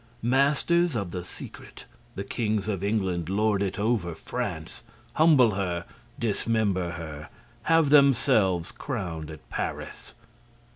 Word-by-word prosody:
Masters 140 +6 +2
of 100 -6 -2
the 90 -1 -4
secret, 90 - -10 0.3
the 100 - -3
Kings 105 0 -1
of 100 -3 -2
England 95 -5 -1
lord 105 0 +1
it 95 -2 -1
over 105 -6 0
France, - - -5 0.3
humble 150 -8 +5
her, 90 -3 -2 0.3
dismember 105 -5 0
her, 80 -3 -7 0.4
have 165 -3 +4
themselves 110 - +4
crowned 90 - -5
at 80 -1 -11
Paris. - - -5
100 Hz, 115 wpm, -27 LUFS, 90-120 Hz, 0.4 s, humble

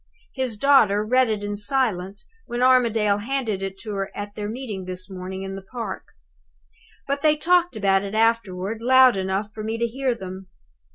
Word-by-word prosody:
His 255 -5 -2
daughter 215 -6 +4
read 255 +2 +3
it 210 -2 -2
in 205 0 -3
silence, 205 -4 -2 0.2
when 240 +1 -2
Armadale 230 -5 +3
handed 230 -4 -2
it 195 0 -4
to 210 - -6
her 195 -1 -2
at 205 0 -6
their 205 0 -5
meeting 220 -6 -5
this 185 0 -6
morning, 190 +1 -6
in 195 0 -5
the 195 - -7
park. 210 -1 -6 1.0
But 280 +1 -2
they 305 0 +4
talked 350 -1 +2
about 195 -2 +2
it 200 +1 -5
afterward, 220 -2 0
loud 260 0 +6
enough 195 +2 -2
for 215 - -6
me 220 +1 -2
to 235 - 0
hear 255 +1 -1
them. 190 -2 -8
215 Hz, 180 wpm, -23 LUFS, 195-250 Hz, 1.0 s, loud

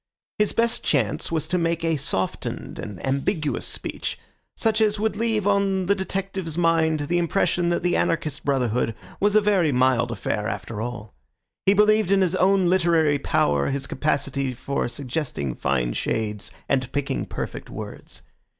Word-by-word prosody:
His 210 - +3
best 230 0 0
chance 125 -4 0
was 160 -2 -1
to 180 +1 +1
make 165 0 0
a 165 -1 +2
softened 95 -10 -3
and 100 -5 -6
ambiguous 140 +3 -1
speech, - - -4 0.4
such 220 -1 +1
as 210 -1 +2
would 220 -1 0
leave 220 -2 0
on 200 -2 +2
the 200 - +4
detective's 190 -3 -3
mind 165 -2 +2
the 175 +4 0
impression 175 0 +1
that 170 0 0
the 175 0 +2
anarchist 155 -4 0
brotherhood 125 -5 0 0.2
was 205 +1 +2
a 215 - +7
very 195 -7 +3
mild 125 -2 +3
affair 105 -1 -2
after 115 -1 -4
all. 110 -3 -6 0.5
He 195 - +6
believed 210 -1 +4
in 195 -1 +4
his 185 -1 +2
own 190 0 +4
literary 170 -5 +3
power, 70 - +1
his 140 0 -2
capacity 140 -2 -1
for 140 +3 -2
suggesting 125 - -3
fine - - 0
shades 105 -2 -2 0.2
and 130 -2 0
picking 145 -1 -2
perfect - - -5
words. - - -8
160 Hz, 160 wpm, -24 LUFS, 130-190 Hz, 0.5 s, a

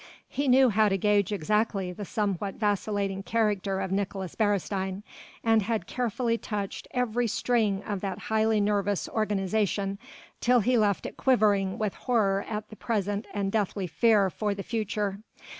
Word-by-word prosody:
He 280 0 -2
knew 260 0 +6
how 215 +1 +4
to 195 - +1
gauge 205 0 +2
exactly 205 0 0
the 200 +3 -7
somewhat 200 -1 -2
vacillating 205 -2 -1
character 205 -3 0
of 190 -1 -3
Nicolaes 195 -2 -2
Beresteyn, 200 -2 -1 0.4
and 225 -1 +4
had 215 -2 -1
carefully 235 0 -1
touched 205 -3 -4
every 245 -1 0
string 215 -3 +1
of 200 -3 -4
that 195 -2 -3
highly 220 0 +1
nervous 205 -1 0
organization 200 -1 -1 0.4
till 245 0 +4
he 250 +4 +2
left 205 -6 +2
it - - -6
quivering 205 -7 +2
with 215 -3 -1
horror 200 -5 +1
at 210 -1 -4
the - - -8
present 205 -1 -2
and 200 -1 -2
deathly 205 -2 -1
fear 200 +3 +3
for 205 +1 -2
the 200 - -5
future. 210 -3 -2
205 Hz, 155 wpm, -28 LUFS, 195-220 Hz, 0.4 s, knew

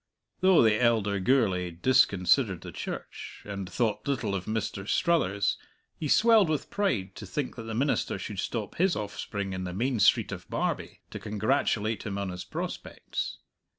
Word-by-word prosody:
Though 185 -5 +6
the 110 0 +3
elder 110 -4 +2
Gourlay 95 -5 +2
disconsidered 100 0 +3
the - - -8
Church, - - -7
and 100 -2 -5
thought 115 +3 -1
little 125 -7 -1
of 95 -2 -3
Mr. 110 -3 -3
Struthers, 100 - +1 0.4
he 155 - -2
swelled 215 - +5
with 150 -3 -2
pride 115 - 0
to 105 - -8
think 135 +8 -3
that 115 - -7
the 110 -1 -4
minister 135 -4 0
should 100 0 -6
stop 105 0 -3
his 185 0 +3
offspring 100 -1 -4
in 95 0 -3
the 90 -1 -4
Main 120 +3 0
Street - - +4
of - - -7
Barbie, - - -2
to - - -6
congratulate 110 0 0
him 100 -2 -4
on 100 -1 -2
his 90 0 -5
prospects. - - -5
110 Hz, 165 wpm, -28 LUFS, 100-130 Hz, 0.4 s, Though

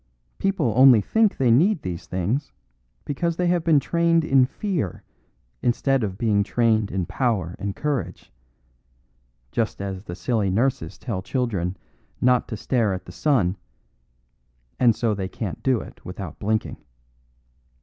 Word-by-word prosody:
People 190 - +1
only 130 -2 +8
think 220 - +2
they 125 -3 +3
need 170 - +3
these 90 -2 -5
things 105 +11 -2 0.5
because 170 +4 -1
they 180 - +1
have 175 -1 +2
been 160 -3 +4
trained 165 +1 +2
in 135 -3 +4
fear 170 - -3 0.6
instead 130 +1 +1
of 95 -3 -3
being 105 -2 +2
trained 110 -1 +1
in 95 -2 -2
power 100 -10 -1
and 100 0 -3
courage, 145 0 -3 1.2
just 115 -1 -1
as 95 -1 -4
the 90 -4 -8
silly 100 +2 0
nurses 125 +7 0
tell 110 -5 -4
children 100 -6 -2 0.4
not 125 0 +3
to 110 - -5
stare 110 -3 0
at 95 - -8
the - - -10
sun, 115 - +1 1.2
and 120 -3 +5
so 115 -3 0
they 95 -2 -3
can't 100 -5 -5
do 130 -4 +1
it - - -13
without 90 -3 -7
blinking. 110 +1 -1
115 Hz, 145 wpm, -24 LUFS, 100-135 Hz, 1.2 s, only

